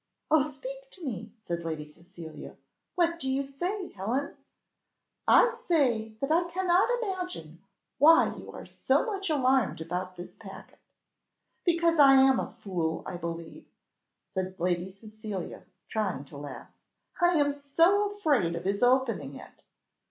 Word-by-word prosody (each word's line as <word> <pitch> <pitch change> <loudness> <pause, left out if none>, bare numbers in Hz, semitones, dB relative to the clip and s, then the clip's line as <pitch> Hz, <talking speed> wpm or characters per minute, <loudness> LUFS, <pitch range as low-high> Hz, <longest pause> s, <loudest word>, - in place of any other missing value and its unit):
"Oh 315 -1 +6
speak - - -6
to 360 -4 -9
me!" 225 -4 -5
said 170 -2 -3
Lady 160 -2 -4
Cecilia, 165 +1 -11 0.4
"what 340 -1 +1
do 265 - 0
you 270 +1 0
say, 355 +8 -4
Helen?" 235 +9 -3 0.9
"I 480 - +6
say 235 -10 +2
that 275 +2 -1
I 340 +2 +3
cannot 360 +3 +2
imagine 360 - -5 0.4
why 325 +4 +6
you - - -10
are - - -9
so - - +1
much 395 -5 -3
alarmed 265 - +2
about 180 +3 -4
this 175 0 -9
packet." - - -12 0.8
"Because 335 -2 +2
I 275 -1 +8
am 265 -1 +6
a - - -3
fool, 170 -5 -2
I 180 - -5
believe," 170 -1 -7 0.6
said 185 0 -4
Lady 175 +1 0
Cecilia, 210 -1 -8 0.2
trying 195 -10 -2
to 140 - -12
laugh. 140 -2 -9 0.5
"I 350 -1 +4
am 285 -1 +2
so 335 +9 +2
afraid 280 - +1
of 170 - -5
his 200 +1 0
opening 245 - +2
it." - - -13
255 Hz, 145 wpm, -28 LUFS, -, 0.9 s, I